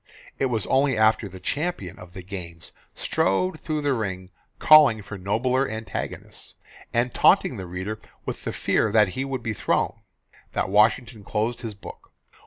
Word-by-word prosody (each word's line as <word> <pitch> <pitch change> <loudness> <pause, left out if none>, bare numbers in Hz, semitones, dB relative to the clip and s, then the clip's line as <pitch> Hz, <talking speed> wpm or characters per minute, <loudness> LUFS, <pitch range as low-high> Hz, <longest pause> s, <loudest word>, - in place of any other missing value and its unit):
It 135 - +2
was 115 -5 -1
only 135 -3 +2
after 110 -1 +3
the 95 0 -11
champion 140 - -3
of 90 -1 -12
the 95 - -8
games 85 -3 -8 0.2
strode 155 - 0
through 155 -1 -2
the 145 -1 +2
ring 95 -5 -4 0.3
calling 145 -9 +6
for 100 - -8
nobler 120 +8 0
antagonists, 110 -2 -6 0.4
and 120 +1 0
taunting - - +4
the 95 - -6
reader 95 +5 -5 0.3
with - - -5
the - - -3
fear 110 - +1
that 105 -2 +4
he 130 +9 -3
would 135 -3 -4
be 110 -1 -2
thrown, - - 0 0.5
that - - -1
Washington 110 +2 +2
closed 110 +4 -2
his 110 -3 -6
book. 100 - -12
110 Hz, 165 wpm, -24 LUFS, 95-130 Hz, 0.5 s, calling